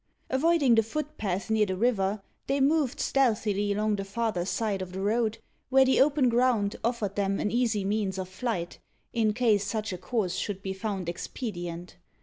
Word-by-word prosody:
Avoiding 285 -1 +3
the 225 - +6
footpath 225 -6 -3
near 215 -1 +3
the 185 -1 -2
river, 205 -3 +1 0.2
they 275 +1 +1
moved 280 -1 +2
stealthily 210 -6 +1
along 210 +1 +1
the 195 - -3
farther 195 -3 -2
side 195 +1 -1
of 185 -1 -6
the 190 - -4
road, 220 +2 +1 0.3
where 265 0 +6
the 260 0 +4
open 280 -1 +4
ground 235 -4 +2
offered 225 -4 -1
them 195 -1 0
an 210 - -1
easy 230 -4 +1
means 200 -2 -1
of 185 -1 -3
flight, 185 -2 -4 0.3
in 225 -2 +2
case 215 -3 +2
such 215 0 -3
a 180 - -6
course 185 -1 -1
should 200 -2 -3
be 190 - -3
found 190 -2 -4
expedient. 175 -2 -5
215 Hz, 175 wpm, -28 LUFS, 195-240 Hz, 0.3 s, the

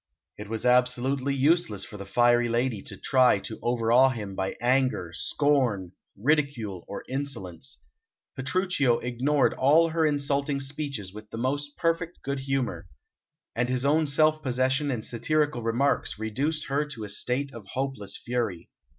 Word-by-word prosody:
It 105 0 -9
was 115 +2 -3
absolutely 125 +2 +2
useless 140 - +2
for 105 - -10
the 100 0 -8
fiery 120 +2 +3
lady 120 -2 0
to - - -8
try 130 -4 +4
to 110 - -7
overawe 120 +2 +4
him 105 -6 -5
by 95 0 -3
anger, 125 -8 +1
scorn, 125 -11 +1 0.3
ridicule, 120 - 0
or 100 - -6
insolence. 120 - -4 0.6
Petruchio 140 -3 +1
ignored 130 +4 +1
all 155 +5 +4
her 165 0 0
insulting 140 -1 +1
speeches 135 -8 -4
with 105 0 -11
the - - -7
most 145 +4 -2
perfect 165 0 -1
good 140 0 -2
humour, 135 -7 -2 0.7
and 120 +2 0
his 130 +1 0
own 155 +2 +3
self 155 +2 +3
possession 130 +2 0
and 120 -5 -2
satirical 150 +2 0
remarks 120 +4 0
reduced 135 +9 -1
her 140 +1 0
to 140 -7 -7
a - - -5
state 125 +7 -1
of 110 -4 -10
hopeless 130 -7 -2
fury. 115 -8 -3
130 Hz, 150 wpm, -27 LUFS, 115-145 Hz, 0.7 s, try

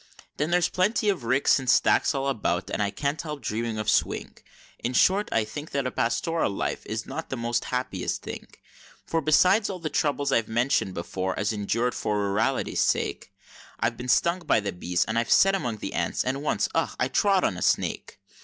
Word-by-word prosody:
Then 150 +2 0
there's 175 0 +3
plenty 205 +4 +1
of 185 -12 -1
ricks 130 +4 +3
and 130 -2 -4
stacks - - +3
all 135 0 -1
about, 100 -7 -1
and - - -1
I 100 - +1
can't 140 +7 -2
help 150 -2 -6
dreaming 115 +1 -2
of 110 0 -4
Swing - - 0 0.4
In 120 - -3
short, 195 +10 +3
I 115 - +2
think 145 +8 -7
that 140 -1 -2
a 130 - -1
plastoral 160 +8 0
life 100 - -3
is - - -3
not - - -6
the 130 - -3
most 120 0 -1
happiest 125 0 -3
thing; - - -7 0.6
For 165 - -1
besides 185 +8 +4
all 190 - -4
the 165 -3 -5
troubles 145 -2 0
I've 115 -3 +2
mentioned 115 -4 0
before 95 +2 -3
as 105 +1 0
endur'd 115 +4 -1
for 105 -1 -1
rurality's 100 +2 0
sake, - - -1 0.5
I've - - 0
been 125 +1 -7
stung 170 +7 +3
by 165 -9 +2
the 100 -1 -3
bees, 90 0 -1
and 110 +1 0
I've 115 - -2
set 195 0 +6
among 120 - -3
ants, - - -1
and 135 +2 -1
once 150 - 0
ugh! - - 0
I - - +2
trod 195 -3 +2
on - - +1
a - - -7
snake! - - 0
125 Hz, 200 wpm, -26 LUFS, 110-155 Hz, 0.6 s, set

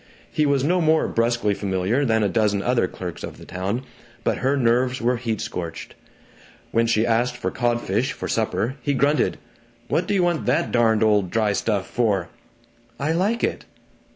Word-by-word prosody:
He 150 -1 +1
was 140 -2 +2
no 175 +5 +2
more 160 0 +3
brusquely 115 -2 +1
familiar 100 +7 0
than 110 -3 +2
a - - +3
dozen 105 -1 +1
other 120 -6 +2
clerks 90 -2 -7
of - - -7
the - - -12
town, 100 +7 -3 0.4
but - - 0
her 135 +3 +1
nerves 125 +1 +2
were 120 +1 +1
heat 115 -3 -2
scorched. 80 -2 -5 0.8
When 115 0 +2
she 115 -1 +2
asked 120 +2 +1
for - - -2
codfish, 120 -1 0
for - - -5
supper, 130 +5 -1
he 140 +2 0
grunted, 145 +3 +2 0.5
"What 175 - +1
d'you 200 -3 +2
want 175 -2 0
that - - +1
darned 110 -2 +3
old 105 -4 +3
dry 110 0 +1
stuff 100 -2 0
for?" 100 -7 0 0.7
"I 145 +3 0
like 200 +8 0
it!" - - -1
115 Hz, 175 wpm, -23 LUFS, 105-135 Hz, 0.8 s, more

